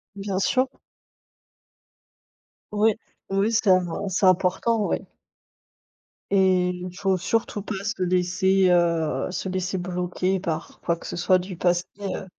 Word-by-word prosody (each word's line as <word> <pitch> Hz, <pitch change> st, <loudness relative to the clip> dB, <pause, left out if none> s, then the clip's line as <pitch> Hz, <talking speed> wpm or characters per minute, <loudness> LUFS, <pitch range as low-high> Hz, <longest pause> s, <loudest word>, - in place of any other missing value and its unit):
Bien 195 Hz, -1 st, -3 dB
sûr. 255 Hz, +6 st, +2 dB, 2.0 s
Oui, 210 Hz, 0 st, +3 dB, 0.3 s
oui, 195 Hz, +3 st, +1 dB
c'est 220 Hz, -2 st, +2 dB, 0.4 s
c'est 190 Hz, +1 st, +1 dB
important, 190 Hz, +4 st, +2 dB
oui. -, -, 0 dB, 1.3 s
Et 185 Hz, -2 st, +4 dB
il 180 Hz, 0 st, -6 dB
faut 190 Hz, -1 st, +1 dB
surtout 215 Hz, +2 st, -1 dB
pas 195 Hz, -1 st, -5 dB
se 200 Hz, -2 st, -3 dB
laisser, 185 Hz, +1 st, +2 dB
heu, 165 Hz, -6 st, +1 dB
se 185 Hz, +1 st, -3 dB
laisser 185 Hz, 0 st, -2 dB
bloquer 180 Hz, +1 st, -1 dB
par 165 Hz, -3 st, -4 dB
quoi 170 Hz, -, 0 dB
que 170 Hz, -, -13 dB
ce -, -, -5 dB
soit 185 Hz, +1 st, +3 dB
du 180 Hz, 0 st, -7 dB
passé, 175 Hz, 0 st, +2 dB, 0.2 s
heu. 195 Hz, -1 st, -4 dB
185 Hz, 130 wpm, -24 LUFS, 180-195 Hz, 2.0 s, Et